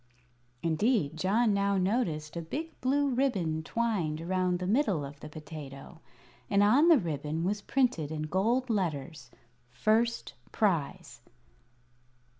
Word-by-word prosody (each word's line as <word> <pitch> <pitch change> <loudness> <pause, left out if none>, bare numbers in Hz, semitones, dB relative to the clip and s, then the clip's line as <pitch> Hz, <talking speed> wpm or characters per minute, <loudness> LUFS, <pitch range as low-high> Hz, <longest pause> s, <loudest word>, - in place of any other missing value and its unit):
Indeed, 165 - +1
John 205 +6 +2
now 200 0 +1
noticed 180 -7 -1
a 170 - -3
big 300 - -5
blue 280 +2 +2
ribbon 205 -12 0
twined 180 -6 -1
around 180 +1 0
the 180 - -4
middle 200 - +1
of 140 +1 -10
the 150 - -9
potato, 155 0 -10 0.5
and 200 0 +4
on 255 +10 +5
the 335 -3 +7
ribbon 160 - -3
was 205 +3 -1
printed 220 - 0
in 155 -1 -3
gold 220 +11 +1
letters: 150 - -3 0.4
"First 220 - 0 0.2
Prize." 170 - -1
185 Hz, 125 wpm, -30 LUFS, 155-230 Hz, 0.5 s, the